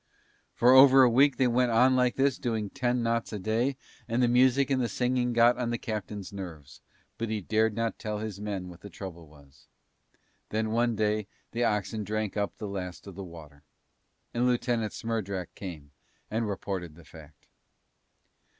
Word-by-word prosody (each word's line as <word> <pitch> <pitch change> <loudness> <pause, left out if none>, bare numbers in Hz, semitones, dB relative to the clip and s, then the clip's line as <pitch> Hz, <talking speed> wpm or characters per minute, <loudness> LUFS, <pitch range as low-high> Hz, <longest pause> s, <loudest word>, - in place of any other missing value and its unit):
For 120 +1 +5
over 135 0 +8
a 125 - +6
week 135 +3 +4
they 130 - +3
went 125 0 +2
on 125 +3 +4
like 125 -1 +2
this 135 0 +1
doing 110 -4 -2
ten 125 -2 0
knots 115 0 -1
a 105 - -3
day 115 +7 0 0.3
and 120 +2 +1
the - - +4
music 130 +3 +3
and 130 -3 +1
singing 125 0 0
got 120 +1 +4
on 120 -2 -1
the 120 - -1
captain's 105 -4 -5
nerves, 80 -8 -9 0.4
but 115 -1 -2
he 110 -1 -1
dared 110 +2 +1
not 115 0 -2
tell 105 -2 -3
his 105 -2 -5
men 100 -3 -4
what 90 -1 -12
the 100 - -9
trouble 85 -3 -9
was. 70 -3 -20 0.8
And 110 - -3
then 110 0 0
one 120 0 +1
day 105 -1 0 0.2
the 120 +1 0
oxen 105 0 -1
drank 105 0 -3
up 100 -1 -2
the 105 - -5
last 90 -3 -6
of 100 - -9
the 100 +2 -7
water. 80 -5 -12 0.7
And 120 +1 +1
Lieutenant 120 -3 0
Smerdrak 100 -6 -4
came 80 -7 -8 0.4
and 110 0 -1
reported 95 -5 -4
the 85 -1 -16
fact. 75 -2 -15
110 Hz, 180 wpm, -28 LUFS, 95-120 Hz, 0.8 s, over